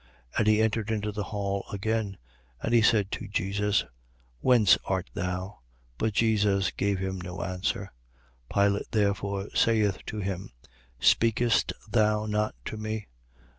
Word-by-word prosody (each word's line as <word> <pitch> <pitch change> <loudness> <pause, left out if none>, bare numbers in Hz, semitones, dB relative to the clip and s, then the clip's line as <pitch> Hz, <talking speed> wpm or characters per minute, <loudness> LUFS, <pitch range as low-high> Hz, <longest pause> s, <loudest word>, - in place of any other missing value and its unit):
19:9. - - -8
And 110 - +2
he 110 0 +5
entered 110 0 0
into 105 -1 -1
the 105 -1 -4
hall 100 -1 -2
again; 105 0 -1 0.4
and 115 - -2
he 120 - +6
said 105 -3 +3
to - - -4
Jesus: 100 +1 0 0.5
Whence 115 - +6
art 95 -2 -2
thou? 90 +2 -4 0.4
But 110 -1 0
Jesus 100 -4 +2
gave 100 -1 0
him 95 0 -3
no 90 +1 -5
answer. 95 +1 -3 0.6
19:10. 100 - +4
Pilate 100 0 0
therefore 100 -1 0
saith 105 -4 +2
to 110 - -4
him: 95 -2 -3 0.5
Speakest 115 - +3
thou 105 0 +2
not 105 - -1
to 110 - -5
me? 110 - -4
105 Hz, 145 wpm, -28 LUFS, 95-110 Hz, 0.6 s, he